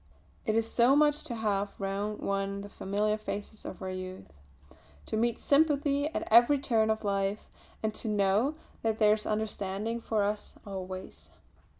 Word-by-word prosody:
It 215 Hz, -, +2 dB
is 225 Hz, 0 st, +2 dB
so 240 Hz, +4 st, +4 dB
much 295 Hz, 0 st, +4 dB
to 240 Hz, -, -4 dB
have 205 Hz, -2 st, -1 dB
round 200 Hz, +2 st, -2 dB
one 195 Hz, 0 st, -1 dB
the 205 Hz, -, -8 dB
familiar 210 Hz, +2 st, -1 dB
faces 210 Hz, 0 st, -6 dB
of -, -, -7 dB
our 185 Hz, -, -3 dB
youth; 185 Hz, -, -8 dB, 0.7 s
to -, -, -3 dB
meet 235 Hz, +1 st, +1 dB
sympathy 285 Hz, -1 st, +2 dB
at 315 Hz, -, -4 dB
every 240 Hz, +6 st, +7 dB
turn 225 Hz, -5 st, +2 dB
of 220 Hz, 0 st, 0 dB
life, 200 Hz, 0 st, -1 dB, 0.3 s
and 220 Hz, 0 st, 0 dB
to 225 Hz, -, -5 dB
know 210 Hz, +7 st, +2 dB, 0.3 s
that 220 Hz, -1 st, 0 dB
there 210 Hz, -1 st, +5 dB
is 215 Hz, 0 st, -2 dB
understanding 215 Hz, +1 st, -2 dB
for 220 Hz, -2 st, 0 dB
us 205 Hz, +1 st, -3 dB
always. 190 Hz, -1 st, -7 dB
215 Hz, 165 wpm, -30 LUFS, 200-230 Hz, 0.7 s, every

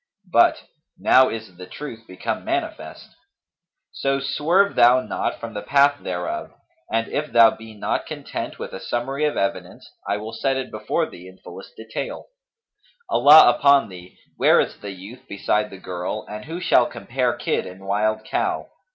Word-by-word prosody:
But, 115 Hz, -, +4 dB, 0.3 s
'Now 130 Hz, 0 st, +5 dB
is 110 Hz, -5 st, -7 dB
the 90 Hz, 0 st, -10 dB
truth 115 Hz, -1 st, -9 dB
become 90 Hz, 0 st, -4 dB
manifest;'[FN#241] -, -, -4 dB, 0.8 s
so 135 Hz, 0 st, -1 dB
swerve 170 Hz, +8 st, +2 dB
thou 120 Hz, +1 st, +6 dB
not 105 Hz, -, -3 dB
from 115 Hz, -1 st, -7 dB
the 105 Hz, -, -5 dB
path 145 Hz, +2 st, +3 dB
thereof; 90 Hz, -1 st, -4 dB, 0.4 s
and, 115 Hz, +1 st, 0 dB
if 150 Hz, 0 st, -3 dB
thou 115 Hz, -1 st, +7 dB
be 110 Hz, -1 st, -12 dB
not 105 Hz, -, -2 dB
content -, -, -6 dB
with -, -, -7 dB
a 95 Hz, -, -6 dB
summary 135 Hz, +9 st, -2 dB
of 150 Hz, -, -1 dB
evidence, 100 Hz, -, -3 dB, 0.2 s
I 100 Hz, -, 0 dB
will 110 Hz, +2 st, -7 dB
set 135 Hz, -1 st, 0 dB
it 130 Hz, -1 st, -5 dB
before 110 Hz, +9 st, -1 dB
thee 90 Hz, +1 st, -12 dB
in 95 Hz, 0 st, -14 dB
fullest -, -, -12 dB
detail. 110 Hz, 0 st, -6 dB, 0.8 s
Allah 155 Hz, -, +8 dB
upon 140 Hz, -3 st, +4 dB
thee, 90 Hz, -1 st, -13 dB, 0.2 s
where -, -, +5 dB
is -, -, -1 dB
the 100 Hz, -, -7 dB
youth 100 Hz, +6 st, -11 dB
beside 105 Hz, +1 st, 0 dB
the 95 Hz, -, -10 dB
girl 90 Hz, +3 st, -5 dB
and 105 Hz, 0 st, -8 dB
who 165 Hz, +2 st, -6 dB
shall -, -, +3 dB
compare -, -, -2 dB
kid -, -, -2 dB
and 95 Hz, +1 st, -11 dB
wild 110 Hz, +2 st, 0 dB
cow? -, -, -2 dB
110 Hz, 170 wpm, -22 LUFS, 100-135 Hz, 0.8 s, Allah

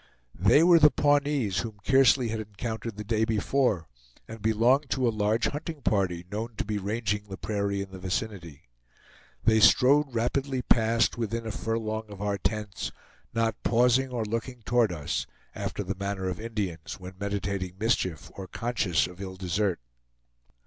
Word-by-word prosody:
They 100 Hz, -, +5 dB
were 170 Hz, -1 st, +7 dB
the 150 Hz, -1 st, +8 dB
Pawnees 145 Hz, -9 st, +1 dB
whom 110 Hz, -3 st, -5 dB
Kearsley 130 Hz, -2 st, +4 dB
had 110 Hz, 0 st, -2 dB
encountered 110 Hz, +1 st, -5 dB
the 105 Hz, -, -4 dB
day 110 Hz, +1 st, 0 dB
before, 110 Hz, -, +1 dB, 0.4 s
and 115 Hz, -1 st, -9 dB
belonged 120 Hz, +6 st, +3 dB
to 130 Hz, -2 st, +1 dB
a -, -, +3 dB
large 105 Hz, +2 st, +1 dB
hunting 150 Hz, -1 st, -6 dB
party 90 Hz, -6 st, 0 dB
known 110 Hz, +3 st, -4 dB
to -, -, -3 dB
be 105 Hz, 0 st, -2 dB
ranging 105 Hz, 0 st, -2 dB
the 95 Hz, -1 st, -7 dB
prairie 100 Hz, 0 st, -1 dB
in 95 Hz, -, -12 dB
the 95 Hz, -, -9 dB
vicinity. 90 Hz, -5 st, -4 dB, 0.8 s
They 110 Hz, 0 st, +4 dB
strode 140 Hz, +6 st, +6 dB
rapidly 130 Hz, +3 st, -1 dB
past, 115 Hz, +1 st, +2 dB
within 115 Hz, 0 st, -2 dB
a 110 Hz, -, -3 dB
furlong 110 Hz, 0 st, -3 dB
of 100 Hz, -2 st, -10 dB
our 100 Hz, 0 st, -1 dB
tents, 105 Hz, -1 st, -3 dB, 0.4 s
not 115 Hz, -1 st, 0 dB
pausing 125 Hz, +3 st, +3 dB
or 120 Hz, -3 st, -2 dB
looking 115 Hz, +2 st, -4 dB
toward 120 Hz, -3 st, +2 dB
us, 75 Hz, -4 st, -3 dB, 0.3 s
after 105 Hz, -, -4 dB
the 95 Hz, +1 st, -3 dB
manner 100 Hz, -1 st, -3 dB
of 90 Hz, -, -4 dB
Indians 100 Hz, -8 st, -4 dB
when 90 Hz, 0 st, -9 dB
meditating 100 Hz, -2 st, -3 dB
mischief 95 Hz, -, -1 dB
or 95 Hz, -1 st, -8 dB
conscious 110 Hz, -6 st, 0 dB
of 90 Hz, +2 st, -10 dB
ill 95 Hz, -1 st, -6 dB
desert. 95 Hz, +1 st, -1 dB
110 Hz, 165 wpm, -27 LUFS, 100-120 Hz, 0.8 s, the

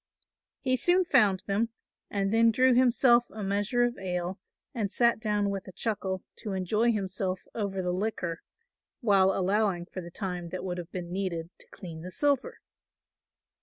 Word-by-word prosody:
He 255 Hz, 0 st, +1 dB
soon 355 Hz, +7 st, +3 dB
found 210 Hz, -, +3 dB
them, 210 Hz, +3 st, 0 dB, 0.4 s
and 200 Hz, 0 st, -1 dB
then 230 Hz, 0 st, +5 dB
drew 255 Hz, +3 st, +4 dB
himself 245 Hz, -1 st, +5 dB
a 215 Hz, -, -7 dB
measure 205 Hz, +5 st, +1 dB
of 240 Hz, 0 st, -1 dB
ale 180 Hz, 0 st, -3 dB, 0.3 s
and 210 Hz, -5 st, -2 dB
sat 235 Hz, -2 st, +3 dB
down 210 Hz, -2 st, 0 dB
with 195 Hz, 0 st, -5 dB
a -, -, -8 dB
chuckle 190 Hz, -2 st, -2 dB
to 210 Hz, -, -5 dB
enjoy 210 Hz, +5 st, +2 dB
himself 190 Hz, -3 st, -2 dB
over 200 Hz, -4 st, -2 dB
the 180 Hz, -, 0 dB
liquor, 180 Hz, -4 st, -2 dB, 0.6 s
while 195 Hz, -5 st, +4 dB
allowing 195 Hz, -1 st, +1 dB
for 185 Hz, -, -7 dB
the 170 Hz, -, -9 dB
time 180 Hz, -2 st, -4 dB
that 185 Hz, +2 st, -5 dB
would 180 Hz, -1 st, -3 dB
have 175 Hz, 0 st, -8 dB
been 175 Hz, -2 st, -5 dB
needed 180 Hz, -3 st, -3 dB
to -, -, -9 dB
clean 165 Hz, -3 st, -9 dB
the 180 Hz, -, -7 dB
silver. 280 Hz, +6 st, 0 dB
195 Hz, 165 wpm, -29 LUFS, 185-230 Hz, 0.6 s, then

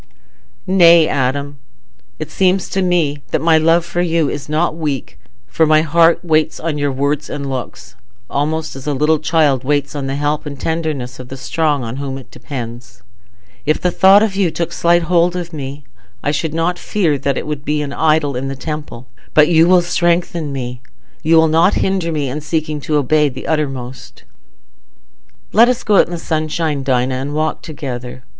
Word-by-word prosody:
"Nay, 170 Hz, -4 st, +6 dB
Adam. 140 Hz, +2 st, -2 dB, 0.6 s
It 155 Hz, 0 st, -7 dB
seems 185 Hz, -1 st, +1 dB
to 195 Hz, -, -1 dB
me 165 Hz, -6 st, 0 dB
that -, -, 0 dB
my 160 Hz, +1 st, +4 dB
love 165 Hz, +2 st, +3 dB
for 175 Hz, -, -2 dB
you 165 Hz, -4 st, +1 dB
is 145 Hz, 0 st, -6 dB
not 155 Hz, +1 st, 0 dB
weak, 150 Hz, -5 st, -4 dB, 0.3 s
for 155 Hz, +11 st, +1 dB
my 155 Hz, 0 st, +4 dB
heart 165 Hz, +2 st, +3 dB
waits 155 Hz, -1 st, +1 dB
on 155 Hz, -2 st, -3 dB
your 145 Hz, -1 st, 0 dB
words 140 Hz, +2 st, -1 dB
and 140 Hz, -1 st, -5 dB
looks, 125 Hz, -6 st, -6 dB, 0.3 s
almost 155 Hz, +4 st, -2 dB
as 135 Hz, +1 st, -9 dB
a 145 Hz, -, 0 dB
little 150 Hz, +3 st, +2 dB
child 150 Hz, -4 st, +2 dB
waits 145 Hz, 0 st, 0 dB
on 140 Hz, -2 st, -4 dB
the 135 Hz, -, -2 dB
help 145 Hz, +1 st, -1 dB
and 140 Hz, -2 st, -7 dB
tenderness 155 Hz, -7 st, -3 dB
of 130 Hz, -, -9 dB
the 135 Hz, -, -8 dB
strong 145 Hz, +1 st, -1 dB
on 115 Hz, +2 st, -5 dB
whom 135 Hz, -1 st, -4 dB
it 135 Hz, -, -13 dB
depends. 120 Hz, -7 st, -8 dB, 0.6 s
If 155 Hz, +1 st, +1 dB
the 180 Hz, -, 0 dB
thought 195 Hz, +3 st, +6 dB
of 210 Hz, -3 st, -1 dB
you 195 Hz, -3 st, +2 dB
took 170 Hz, +1 st, -3 dB
slight 170 Hz, 0 st, +2 dB
hold 175 Hz, +1 st, +2 dB
of 175 Hz, -1 st, -5 dB
me, 140 Hz, -1 st, -6 dB, 0.4 s
I 145 Hz, -, +1 dB
should 155 Hz, +1 st, -2 dB
not 175 Hz, +2 st, 0 dB
fear 165 Hz, -9 st, 0 dB
that 140 Hz, -1 st, -1 dB
it -, -, -3 dB
would 150 Hz, -2 st, -4 dB
be 150 Hz, 0 st, -1 dB
an 140 Hz, -1 st, -6 dB
idol 155 Hz, -3 st, +1 dB
in 130 Hz, +2 st, -3 dB
the 135 Hz, -, -4 dB
temple. 145 Hz, -4 st, -6 dB, 0.3 s
But 150 Hz, +1 st, +6 dB
you 165 Hz, 0 st, +5 dB
will 180 Hz, -1 st, +5 dB
strengthen 170 Hz, -2 st, 0 dB
me—you 130 Hz, +5 st, -4 dB
will 160 Hz, 0 st, +5 dB
not 165 Hz, +5 st, +3 dB
hinder 190 Hz, -3 st, 0 dB
me 150 Hz, -3 st, -1 dB
in 145 Hz, +4 st, -4 dB
seeking 155 Hz, -1 st, -2 dB
to 150 Hz, -, -2 dB
obey 150 Hz, +1 st, +2 dB
to 130 Hz, -, -13 dB
the -, -, -7 dB
uttermost." 135 Hz, -5 st, -4 dB, 1.3 s
"Let 230 Hz, +3 st, +6 dB
us 250 Hz, 0 st, -1 dB
go 210 Hz, -2 st, +3 dB
out -, -, +5 dB
into 175 Hz, -, -7 dB
the -, -, -3 dB
sunshine, 155 Hz, -2 st, -2 dB
Dinah, 130 Hz, -1 st, 0 dB
and 135 Hz, +3 st, -4 dB
walk 155 Hz, 0 st, -1 dB
together. 130 Hz, -5 st, -7 dB
150 Hz, 190 wpm, -17 LUFS, 140-165 Hz, 1.3 s, Nay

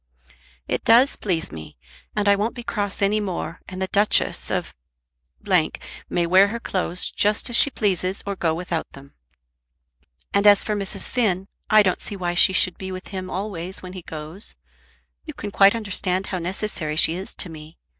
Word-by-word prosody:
"It -, -, -2 dB
does 245 Hz, +5 st, +5 dB
please 170 Hz, -5 st, -2 dB
me, 80 Hz, -4 st, -10 dB, 0.4 s
and 210 Hz, -1 st, 0 dB
I 200 Hz, -, +6 dB
won't 215 Hz, +5 st, -2 dB
be 240 Hz, -, -7 dB
cross 205 Hz, -3 st, -2 dB
any 205 Hz, +2 st, +2 dB
more, 185 Hz, -4 st, -4 dB
and 185 Hz, 0 st, -7 dB
the 190 Hz, -, 0 dB
Duchess 205 Hz, +2 st, +1 dB
of -, -, -2 dB, 0.7 s
may 175 Hz, -1 st, -1 dB
wear 185 Hz, +3 st, +5 dB
her 230 Hz, +3 st, -4 dB
clothes 180 Hz, -4 st, -1 dB
just 210 Hz, +4 st, +1 dB
as -, -, 0 dB
she 285 Hz, -, +7 dB
pleases, 190 Hz, -5 st, -1 dB
or 200 Hz, 0 st, -3 dB
go 165 Hz, -3 st, 0 dB
without 170 Hz, -1 st, -4 dB
them. 140 Hz, 0 st, -14 dB, 1.2 s
And 200 Hz, +1 st, +3 dB
as 205 Hz, -1 st, +6 dB
for 215 Hz, -, -2 dB
Mrs. 200 Hz, -2 st, -4 dB
Finn, 195 Hz, -6 st, 0 dB, 0.2 s
I 215 Hz, 0 st, +6 dB
don't 185 Hz, -2 st, 0 dB
see 205 Hz, -, -6 dB
why 175 Hz, -2 st, -2 dB
she 180 Hz, +3 st, +6 dB
should 185 Hz, -1 st, +3 dB
be 190 Hz, 0 st, -6 dB
with 185 Hz, 0 st, -8 dB
him 185 Hz, -2 st, -5 dB
always 190 Hz, -2 st, -5 dB
when 185 Hz, 0 st, -8 dB
he 185 Hz, -, -7 dB
goes. 160 Hz, +5 st, -6 dB, 0.7 s
You -, -, -8 dB
can 205 Hz, -, -6 dB
quite 200 Hz, +2 st, +5 dB
understand 190 Hz, -3 st, -1 dB
how 185 Hz, -, -3 dB
necessary 175 Hz, -3 st, -3 dB
she 160 Hz, -, +5 dB
is 185 Hz, +3 st, -6 dB
to 180 Hz, -, -2 dB
me. 155 Hz, 0 st, -12 dB
190 Hz, 185 wpm, -23 LUFS, 175-205 Hz, 1.2 s, she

